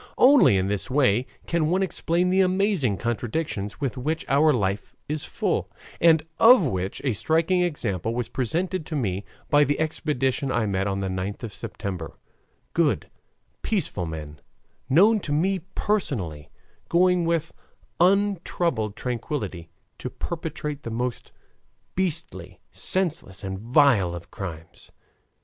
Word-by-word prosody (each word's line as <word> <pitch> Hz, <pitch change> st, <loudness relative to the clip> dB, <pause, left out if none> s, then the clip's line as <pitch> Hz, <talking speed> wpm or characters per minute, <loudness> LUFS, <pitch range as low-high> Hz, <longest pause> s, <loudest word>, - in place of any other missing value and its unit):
Only 260 Hz, -, +6 dB
in 95 Hz, -, +1 dB
this 100 Hz, +4 st, -1 dB
way 130 Hz, -3 st, +2 dB, 0.2 s
can 165 Hz, -2 st, +1 dB
one 185 Hz, +4 st, +2 dB
explain 180 Hz, -1 st, 0 dB
the 190 Hz, +1 st, +4 dB
amazing 185 Hz, -, +2 dB
contradictions 115 Hz, -, -3 dB
with 135 Hz, -2 st, -2 dB
which 155 Hz, +5 st, -2 dB
our 150 Hz, +3 st, +4 dB
life 100 Hz, -5 st, -1 dB
is 150 Hz, 0 st, -3 dB
full, -, -, -1 dB, 0.3 s
and 160 Hz, -2 st, +5 dB
of 240 Hz, -2 st, +8 dB
which 95 Hz, -, -2 dB
a 130 Hz, -, +2 dB
striking 165 Hz, -, +2 dB
example 115 Hz, -, -1 dB
was 120 Hz, -1 st, -1 dB
presented 170 Hz, -, -1 dB
to 160 Hz, -, -4 dB
me 100 Hz, -8 st, -1 dB, 0.3 s
by 145 Hz, 0 st, +6 dB
the 145 Hz, 0 st, 0 dB
expedition 145 Hz, -4 st, -1 dB
I 115 Hz, -3 st, +1 dB
met 95 Hz, -1 st, 0 dB
on 100 Hz, 0 st, -1 dB
the 95 Hz, -, -1 dB
9th 95 Hz, +4 st, -4 dB
of 110 Hz, -3 st, -5 dB
September; 90 Hz, -6 st, -6 dB, 0.6 s
good, -, -, +1 dB, 0.5 s
peaceful 150 Hz, -, -1 dB
men, 75 Hz, -2 st, -7 dB, 0.5 s
known 205 Hz, +10 st, +5 dB
to 155 Hz, -, -6 dB
me 185 Hz, +6 st, +1 dB, 0.2 s
personally, 95 Hz, -, -2 dB, 0.4 s
going 180 Hz, 0 st, +4 dB
with 165 Hz, -2 st, 0 dB, 0.5 s
untroubled 175 Hz, -, +1 dB
tranquillity 115 Hz, -, -4 dB, 0.3 s
to -, -, -4 dB
perpetrate 150 Hz, -3 st, -5 dB
the 115 Hz, -, -6 dB
most 120 Hz, +2 st, -3 dB, 0.6 s
beastly, 120 Hz, -, -3 dB
senseless, 160 Hz, -, -1 dB
and 95 Hz, 0 st, -4 dB
vile 115 Hz, -, +3 dB
of 85 Hz, -1 st, -10 dB
crimes. 80 Hz, -6 st, -8 dB
135 Hz, 135 wpm, -25 LUFS, -, 0.6 s, of